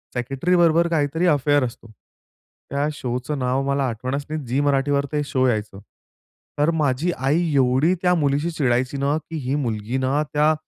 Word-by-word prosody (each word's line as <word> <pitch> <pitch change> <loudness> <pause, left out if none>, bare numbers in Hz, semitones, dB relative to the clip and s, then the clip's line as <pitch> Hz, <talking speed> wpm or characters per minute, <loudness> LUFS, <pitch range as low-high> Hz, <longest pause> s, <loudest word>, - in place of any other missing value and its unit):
सेक्रेटरीबरोबर 165 +7 +2
काहीतरी 160 +1 0
अफेअर 145 -2 +3
असतो. 115 -1 -9 0.8
त्या 140 +2 0
शोचं 125 +2 -4
नाव 130 +1 0
मला 140 0 +1
आठवणच 130 +5 -4
नाही 155 -2 -4
झी 125 +3 -1
मराठीवर 140 0 +1
ते 150 -1 0
शो 130 -3 0
यायचं. 105 -4 -2 0.8
तर 150 +3 +3
माझी 145 +5 +1
आई 155 +6 +1
एवढी 135 +6 +3
त्या 180 -1 +3
मुलीशी 145 +1 0
चिडायची 130 -3 0
ना, 140 +2 +1
की 160 +1 -8
ही 130 +2 0
मुलगी 115 -3 -2
ना 135 +3 +1
त्या 150 +1 +3
140 Hz, 155 wpm, -22 LUFS, 130-155 Hz, 0.8 s, अफेअर